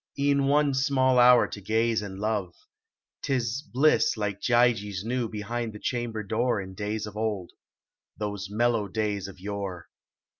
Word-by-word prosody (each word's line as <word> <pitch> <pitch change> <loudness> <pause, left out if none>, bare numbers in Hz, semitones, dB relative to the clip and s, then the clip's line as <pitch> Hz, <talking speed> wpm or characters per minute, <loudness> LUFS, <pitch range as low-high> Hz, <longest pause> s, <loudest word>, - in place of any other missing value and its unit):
E 140 0 +2
en 140 -1 +2
one 145 0 +3
small 130 -2 +3
hour 125 0 +7
to 100 - -8
gaze 110 +2 +1
and 95 -2 -7
love. 100 -5 -2 0.7
Tis 125 -1 -1
bliss 150 -3 +2
Like 105 -2 -3
Gyges 115 -6 +2
knew 120 -1 -1
behind 110 +2 -4
the 105 - -9
chamlxjr 115 -4 -3
door 115 +2 +1
In 95 -1 -7
days 105 +2 -3
of 105 -1 -9
old. 105 -4 -2 0.7
Those 100 -2 -4
mellow 115 0 +1
days 105 -1 -2
of 100 - -12
yore. 100 -3 -5
110 Hz, 155 wpm, -27 LUFS, 100-120 Hz, 0.7 s, hour